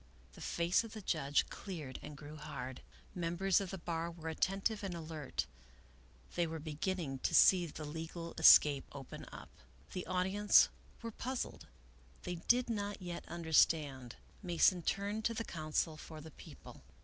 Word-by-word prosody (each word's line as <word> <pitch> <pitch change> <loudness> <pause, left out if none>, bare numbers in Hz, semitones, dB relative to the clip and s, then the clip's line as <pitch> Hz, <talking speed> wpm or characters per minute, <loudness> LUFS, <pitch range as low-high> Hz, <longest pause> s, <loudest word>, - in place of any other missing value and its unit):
The - - -13
face 170 +5 +1
of 230 - -9
the 215 - -7
judge 145 -5 +1
cleared 155 -10 -6
and 150 -1 -9
grew 150 +1 -9
hard. 140 -4 -6 0.3
The - - -7
mem 170 0 -1
bers 195 +2 +3
of 195 - -4
the 195 - -5
bar 170 -1 -3
were 165 -1 -6
attentive 195 +6 0
and 190 -3 -3
alert; 155 - -4 0.9
they 175 -1 +1
were 160 0 -4
begin 160 +5 -2
ning 135 -7 -4
to - - 0
see 180 -2 +7
the 155 0 -7
legal 165 +2 -6
escape 145 -3 +8
open 140 -2 -8
up. - - -10 0.4
The 180 - -4
audience 190 +3 +4 0.3
were 230 - -4
puzzled; 255 +3 -4 0.6
they 180 -1 -3
did 245 +1 +4
not 205 -3 -3
yet 175 -2 -6
understand. 155 -6 +2 0.3
Mason 180 -1 +3
turned 200 +5 -1
to 230 - +1
the 230 - -2
counsel 155 0 -1
for 155 0 -9
the 155 +1 -10
People. - - -13
170 Hz, 165 wpm, -35 LUFS, 155-190 Hz, 0.9 s, escape